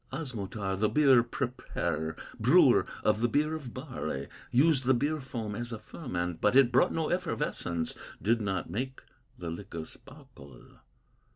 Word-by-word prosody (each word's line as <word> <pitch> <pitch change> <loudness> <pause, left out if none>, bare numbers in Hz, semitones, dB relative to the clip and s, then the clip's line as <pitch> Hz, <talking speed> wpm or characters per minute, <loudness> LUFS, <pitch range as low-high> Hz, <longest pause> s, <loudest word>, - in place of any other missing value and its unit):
"Osmotar, 110 -8 -3
the 110 0 +3
beer 135 -5 +6
preparer, 115 - -3 0.2
Brewer - - +5 0.2
of 110 0 +2
the 120 - +3
beer 150 +5 +1
of 145 -6 -5
barley, 125 - -5 0.2
Used 135 0 +4
the 130 0 +4
beer 150 +4 0
foam 115 -5 -5
as 120 +3 -5
a 115 - -4
ferment; 90 - -4
But 105 - +3
it 135 -3 +6
brought 130 - +4
no 160 -1 -1
effervescence, 85 - -2 0.3
Did 115 +2 +2
not 95 -3 -2
make 130 +9 -4 0.3
the 85 -2 -5
liquor 85 -2 -6
sparkle. 70 -3 -14
120 Hz, 150 wpm, -30 LUFS, 95-135 Hz, 0.3 s, beer